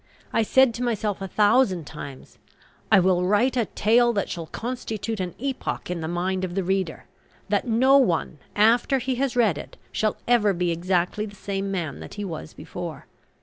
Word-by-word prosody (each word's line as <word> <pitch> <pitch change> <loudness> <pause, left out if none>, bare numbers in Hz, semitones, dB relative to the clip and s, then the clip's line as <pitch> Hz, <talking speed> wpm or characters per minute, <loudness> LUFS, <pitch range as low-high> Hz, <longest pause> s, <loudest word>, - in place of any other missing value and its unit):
I - - +3
said 260 +2 +4
to 245 - -4
myself 215 -4 -1
a 195 - -3
thousand 205 - +3
times, 140 -1 -10 0.5
"I 195 - +8
will 180 -1 +3
write 210 +8 +2
a 240 -3 +2
tale 235 +4 +3
that 200 -3 -1
shall 165 -2 -5
constitute 225 -2 -4
an 180 -2 -3
epoch 265 -7 -3
in 175 -2 -3
the 160 - -3
mind 185 +2 -1
of 180 -1 -3
the 195 - 0
reader, 190 -2 -1 0.4
that - - +1
no 260 +4 +5
one, 170 - 0 0.2
after 235 +5 +4
he 260 +1 -1
has 275 -3 0
read 215 -11 +3
it, - - -10
shall 215 -1 0
ever 225 -4 +4
be 175 -1 0
exactly 180 +4 0
the 205 - -12
same 195 0 -3
man 170 -7 -3
that - - -9
he 205 0 -4
was 160 -3 -7
before." 170 -4 -7
200 Hz, 190 wpm, -24 LUFS, 180-235 Hz, 0.5 s, I